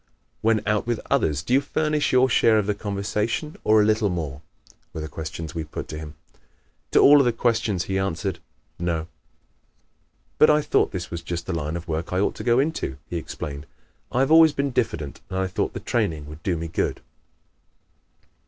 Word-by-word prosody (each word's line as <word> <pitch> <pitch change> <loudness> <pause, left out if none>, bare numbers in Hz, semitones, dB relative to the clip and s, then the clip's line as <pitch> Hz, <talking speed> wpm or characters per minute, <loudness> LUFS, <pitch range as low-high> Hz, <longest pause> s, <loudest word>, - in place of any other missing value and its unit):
When 110 -1 +2
out 105 +1 +1
with 120 -2 0
others 75 -1 +1
do 120 - -1
you 135 - +5
furnish 150 +1 0
your 130 0 +5
share 115 -2 +4
of 105 - +1
the 105 - +1
conversation 105 +7 -2
or 110 0 +5
a 105 - +4
little 110 -1 +2
more?" 75 -6 -4 0.5
were 80 - -5
the 80 - -4
questions 80 0 -6
we 80 - -3
put 75 - -7
to 75 - -5
him. 75 -1 -8 0.7
To - - +1
all 145 +1 +8
of 140 - +4
the 120 - +3
questions 110 -5 0
he 95 0 -1
answered 95 -1 -2 0.4
"No." 85 -2 -1 1.3
"But 155 - +7
I 150 0 +4
thought - - +2
this 90 -2 -5
was 85 0 -4
just 85 0 -4
the 95 - -3
line 80 -1 -2
of 85 0 -8
work 80 0 -3
I 90 - +1
ought 100 - +1
to - - -6
go 120 0 +3
into," 135 - -1
he 85 - -1
explained, 75 -2 -6 0.4
"I 125 - +1
have 135 - +1
always 160 -1 +7
been 140 -1 -1
diffident 85 - -2
and 95 - -3
I 95 - +1
thought 95 - -2
the - - -4
training 85 -11 -1
would 75 +2 -10
do 85 0 -1
me 85 +1 -4
good." 80 - -2
95 Hz, 200 wpm, -24 LUFS, 80-120 Hz, 1.3 s, all